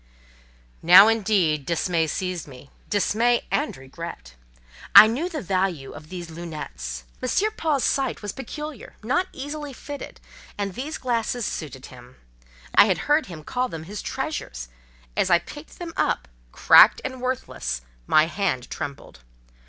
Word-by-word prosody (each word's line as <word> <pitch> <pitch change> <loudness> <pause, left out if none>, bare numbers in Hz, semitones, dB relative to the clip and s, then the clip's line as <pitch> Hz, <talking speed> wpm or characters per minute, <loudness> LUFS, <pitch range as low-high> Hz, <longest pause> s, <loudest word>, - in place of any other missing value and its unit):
Now, 180 +5 +9
indeed, 195 -9 +1
dismay 165 +1 0
seized 180 0 -3
me—dismay 205 - -1
and 290 - -1
regret. 135 - -9 0.6
I - - +13
knew 260 +11 -1
the 310 -7 -5
value 185 -6 -1
of 155 +1 -12
these 175 -3 -7
"lunettes": 70 - -7 0.2
M. 395 - +1
Paul's 300 -8 0
sight 275 -5 0
was 205 - -3
peculiar, 300 +1 -8
not 320 +11 +1
easily 290 +1 -6
fitted, 285 +3 -8 0.4
and 200 -2 -3
these 275 - -5
glasses 240 -1 -1
suited 140 -8 -5
him. 125 0 -14 0.6
I - - +8
had 190 -4 +1
heard 300 +2 +2
him 165 -4 -9
call 250 +9 -1
them 160 -1 -7
his 200 +5 -7
treasures: - - -5 0.5
as - - +1
I 175 - +6
picked 295 - -11
them 340 -2 -7
up, 65 - 0 0.2
cracked - - +7
and 260 -1 -5
worthless, 255 - -3 0.3
my 155 0 +5
hand 170 -8 -2
trembled. 140 -1 -7
195 Hz, 140 wpm, -24 LUFS, 155-255 Hz, 0.6 s, I